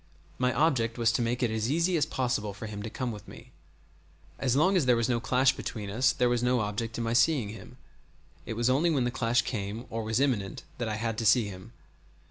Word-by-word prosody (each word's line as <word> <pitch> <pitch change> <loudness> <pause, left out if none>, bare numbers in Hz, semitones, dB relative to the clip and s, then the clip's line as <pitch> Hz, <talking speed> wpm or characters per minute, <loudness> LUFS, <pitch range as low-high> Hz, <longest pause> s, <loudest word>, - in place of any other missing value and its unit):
My 125 0 +2
object 130 -7 +1
was 115 -1 +3
to - - 0
make 120 +2 -1
it 120 - +1
as 110 +1 -1
easy 170 +5 +2
as 155 - +2
possible 120 -6 -2
for 100 - -7
him 105 -1 -6
to 110 - -5
come 125 +2 -3
with 105 -3 -10
me. - - -13 0.9
As 130 -2 +1
long 185 +7 +3
as 160 -8 +2
there 125 - +5
was 115 -1 +1
no 120 -2 +1
clash 130 +2 +2
between 105 -4 -5
us 130 +5 +3
there 125 - +1
was 120 -1 +1
no 125 0 +2
object 110 +2 -3
in 120 - -2
my 115 0 -1
seeing 120 -2 +3
him; 115 +3 -11 0.7
it - - -5
was 120 +1 0
only 140 +7 +3
when 140 -6 +1
the 120 - 0
clash 120 -1 +1
came 110 0 -4
or 115 - -2
was 110 +2 -1
imminent 115 -9 -1 0.2
that 120 -2 -2
I 110 - -2
had 115 0 -2
to 115 - -2
see 110 -1 +4
him. 95 -1 -10
120 Hz, 240 wpm, -28 LUFS, 110-130 Hz, 0.9 s, there